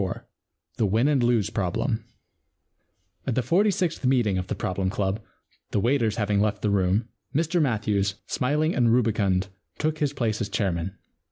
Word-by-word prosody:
IV 95 Hz, -, -3 dB, 0.6 s
THE 110 Hz, -, +2 dB
WIN 110 Hz, +7 st, +2 dB
AND 145 Hz, -3 st, +3 dB
LOSE 120 Hz, -4 st, +2 dB
PROBLEM 110 Hz, +5 st, -1 dB, 1.2 s
At 125 Hz, -, 0 dB
the 130 Hz, -, +1 dB
forty 185 Hz, -, +3 dB
sixth 180 Hz, -6 st, -1 dB
meeting 120 Hz, -7 st, +2 dB
of 90 Hz, -, -4 dB
the -, -, -2 dB
Problem 95 Hz, 0 st, -1 dB
Club, 95 Hz, +1 st, -1 dB, 0.5 s
the -, -, 0 dB
waiters 115 Hz, -1 st, +2 dB
having 105 Hz, -2 st, +1 dB
left 105 Hz, 0 st, 0 dB
the 105 Hz, -, +2 dB
room, 100 Hz, +3 st, +2 dB, 0.3 s
Mr 165 Hz, +3 st, +2 dB
Matthews, 105 Hz, -6 st, +1 dB
smiling 150 Hz, +5 st, 0 dB
and 120 Hz, -3 st, +3 dB
rubicund, 105 Hz, -5 st, +2 dB, 0.3 s
took 155 Hz, 0 st, -1 dB
his 145 Hz, -2 st, +1 dB
place 115 Hz, -4 st, -1 dB
as 100 Hz, -, -2 dB
chairman. 95 Hz, 0 st, -1 dB
110 Hz, 165 wpm, -25 LUFS, 100-130 Hz, 1.2 s, AND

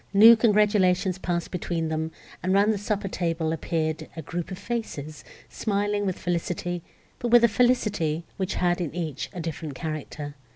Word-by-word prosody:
New 225 Hz, +3 st, +10 dB
congratulations 200 Hz, -4 st, +3 dB
passed 170 Hz, -2 st, -2 dB
between 170 Hz, -2 st, -2 dB
them, 160 Hz, 0 st, -2 dB, 0.3 s
and 185 Hz, +2 st, +1 dB
round 205 Hz, +2 st, +4 dB
the 205 Hz, -, -3 dB
supper 205 Hz, 0 st, -2 dB
table 165 Hz, -3 st, -1 dB
appeared 160 Hz, -1 st, -2 dB
a 160 Hz, -, -5 dB
group 175 Hz, +3 st, -4 dB
of 185 Hz, -, -6 dB
faces, 180 Hz, -10 st, -5 dB, 0.2 s
smiling 205 Hz, -1 st, -1 dB
with 185 Hz, -, -1 dB
felicity, 175 Hz, 0 st, -2 dB, 0.4 s
but 240 Hz, -, -2 dB
with 240 Hz, 0 st, +6 dB
a -, -, +8 dB
felicity, 210 Hz, -9 st, +1 dB
which 190 Hz, -1 st, -2 dB
had 175 Hz, 0 st, +1 dB
in 165 Hz, -, -2 dB
each 160 Hz, -6 st, -3 dB
a 180 Hz, -, -7 dB
different 160 Hz, -3 st, -5 dB
character. 150 Hz, -1 st, -5 dB
180 Hz, 165 wpm, -26 LUFS, 160-205 Hz, 0.4 s, New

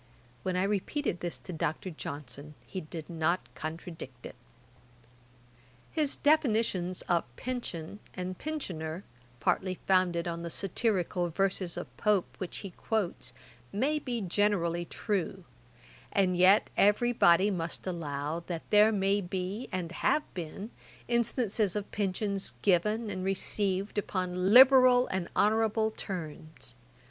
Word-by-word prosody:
When 185 Hz, +5 st, -2 dB
I 180 Hz, -, +2 dB
repeated 200 Hz, -, -1 dB
this 175 Hz, -1 st, -3 dB
to 180 Hz, -, -9 dB
Dr. 160 Hz, +3 st, -2 dB
Johnson, 145 Hz, -1 st, -7 dB
he 190 Hz, -, -5 dB
did 160 Hz, 0 st, -8 dB
not 165 Hz, -4 st, 0 dB
contradict 155 Hz, -5 st, -7 dB
it. -, -, -8 dB, 1.6 s
His 300 Hz, -3 st, +1 dB
definitions 220 Hz, -, +2 dB
of 170 Hz, -2 st, +1 dB
pension 210 Hz, -, -5 dB, 0.2 s
and 185 Hz, 0 st, -4 dB
pensioner, 180 Hz, -, -4 dB, 0.4 s
partly 185 Hz, +8 st, +1 dB
founded 180 Hz, -2 st, +2 dB
on 170 Hz, 0 st, -3 dB
the 170 Hz, -, -4 dB
satirical 180 Hz, -2 st, 0 dB
verses 185 Hz, 0 st, -1 dB
of -, -, -7 dB
Pope, 210 Hz, -4 st, +1 dB
which 185 Hz, -, -4 dB
he 195 Hz, -, -6 dB
quotes, 180 Hz, -, -2 dB, 0.4 s
may 280 Hz, +9 st, +1 dB
be 245 Hz, -5 st, -3 dB
generally 175 Hz, -3 st, +1 dB
true; 190 Hz, -1 st, -2 dB, 0.7 s
and 185 Hz, -2 st, +2 dB
yet 185 Hz, +3 st, +5 dB
every 210 Hz, +4 st, +4 dB
body 190 Hz, -1 st, +5 dB
must 170 Hz, -3 st, -4 dB
allow, 155 Hz, -3 st, -3 dB
that 170 Hz, -2 st, -5 dB
there 210 Hz, +1 st, +7 dB
may 200 Hz, 0 st, +2 dB
be, 190 Hz, +5 st, -4 dB
and 180 Hz, -3 st, -3 dB
have 300 Hz, +10 st, +1 dB
been, 185 Hz, +6 st, -6 dB, 0.4 s
instances 230 Hz, -4 st, +1 dB
of 210 Hz, -1 st, -4 dB
pensions 200 Hz, 0 st, -2 dB
given 210 Hz, +4 st, +2 dB
and 185 Hz, -1 st, -4 dB
received 195 Hz, +1 st, 0 dB
upon 185 Hz, -1 st, -1 dB
liberal 255 Hz, 0 st, +8 dB
and 190 Hz, -2 st, -2 dB
honourable 220 Hz, +1 st, +2 dB
terms. 155 Hz, -, -7 dB
185 Hz, 125 wpm, -30 LUFS, 170-210 Hz, 1.6 s, liberal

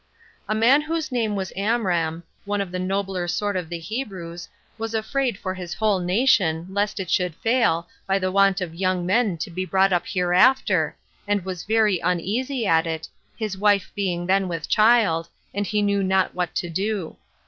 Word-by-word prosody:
A 215 Hz, -, +1 dB
man 245 Hz, +7 st, +5 dB
whose 315 Hz, -1 st, -3 dB
name 225 Hz, -4 st, 0 dB
was 190 Hz, -2 st, -4 dB
Amram, 180 Hz, -6 st, 0 dB, 0.2 s
one 205 Hz, 0 st, -2 dB
of 195 Hz, -3 st, -3 dB
the 185 Hz, -, -3 dB
nobler 190 Hz, -1 st, -2 dB
sort 205 Hz, +3 st, -1 dB
of 180 Hz, -3 st, -3 dB
the 170 Hz, -, -4 dB
Hebrews, 175 Hz, -3 st, -6 dB, 0.3 s
was 225 Hz, 0 st, -3 dB
afraid 240 Hz, +1 st, -1 dB
for 185 Hz, -1 st, -4 dB
his 180 Hz, -2 st, -6 dB
whole 210 Hz, -1 st, +1 dB
nation, 180 Hz, -4 st, +2 dB
lest 205 Hz, +1 st, -1 dB
it 190 Hz, -, -3 dB
should 180 Hz, -3 st, +1 dB
fail, 225 Hz, -7 st, +1 dB, 0.2 s
by 195 Hz, 0 st, +2 dB
the 185 Hz, -1 st, -1 dB
want 195 Hz, 0 st, +3 dB
of 175 Hz, -3 st, -4 dB
young 185 Hz, 0 st, 0 dB
men 200 Hz, -1 st, +2 dB
to 160 Hz, -, -5 dB
be 185 Hz, +2 st, -3 dB
brought 190 Hz, 0 st, +2 dB
up 175 Hz, -, 0 dB
hereafter, 180 Hz, +8 st, +3 dB, 0.3 s
and 205 Hz, -3 st, 0 dB
was 185 Hz, -3 st, -5 dB
very 215 Hz, -3 st, +2 dB
uneasy 225 Hz, +10 st, -1 dB
at 165 Hz, -3 st, +3 dB
it, 160 Hz, -1 st, -4 dB, 0.3 s
his 215 Hz, -4 st, -4 dB
wife 200 Hz, -4 st, +2 dB
being 180 Hz, -4 st, -2 dB
then 190 Hz, +1 st, +2 dB
with 165 Hz, -3 st, -4 dB
child, 215 Hz, -7 st, +3 dB, 0.2 s
and 205 Hz, 0 st, -2 dB
he 210 Hz, -1 st, +1 dB
knew 200 Hz, -1 st, +1 dB
not 190 Hz, 0 st, +1 dB
what 180 Hz, -2 st, -3 dB
to 175 Hz, -, -1 dB
do. 195 Hz, 0 st, -2 dB
190 Hz, 185 wpm, -23 LUFS, 175-215 Hz, 0.3 s, man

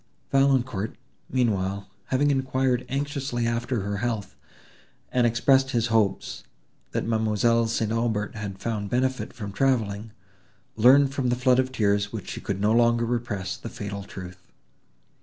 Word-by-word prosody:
Valancourt, 130 Hz, -6 st, +2 dB, 0.3 s
meanwhile, 100 Hz, -5 st, 0 dB, 0.2 s
having 145 Hz, +2 st, +2 dB
enquired 130 Hz, -2 st, 0 dB
anxiously 140 Hz, -3 st, -2 dB
after 115 Hz, 0 st, -1 dB
her 100 Hz, +1 st, -3 dB
health, 110 Hz, -2 st, -3 dB, 0.8 s
and 125 Hz, -1 st, +3 dB
expressed 135 Hz, +3 st, +3 dB
his 120 Hz, -2 st, 0 dB
hopes, 110 Hz, -3 st, 0 dB, 0.5 s
that -, -, -2 dB
M. 110 Hz, -2 st, 0 dB
St. 115 Hz, -1 st, +2 dB
Aubert 115 Hz, 0 st, -1 dB
had 105 Hz, -4 st, -6 dB
found 105 Hz, -1 st, -3 dB
benefit 130 Hz, +2 st, 0 dB
from 105 Hz, -5 st, -7 dB
travelling, 110 Hz, -3 st, 0 dB, 0.7 s
learned 135 Hz, +4 st, +6 dB
from 135 Hz, -3 st, 0 dB
the 120 Hz, -, +2 dB
flood 125 Hz, 0 st, +3 dB
of 130 Hz, 0 st, +1 dB
tears, 100 Hz, -4 st, +1 dB
which 110 Hz, -3 st, -6 dB
she -, -, -6 dB
could 100 Hz, -1 st, -3 dB
no 105 Hz, +2 st, +2 dB
longer 120 Hz, 0 st, +3 dB
repress, 115 Hz, -5 st, -2 dB
the 115 Hz, -, -8 dB
fatal 100 Hz, -2 st, -6 dB
truth. 90 Hz, -2 st, -9 dB
115 Hz, 140 wpm, -25 LUFS, 105-130 Hz, 0.8 s, learned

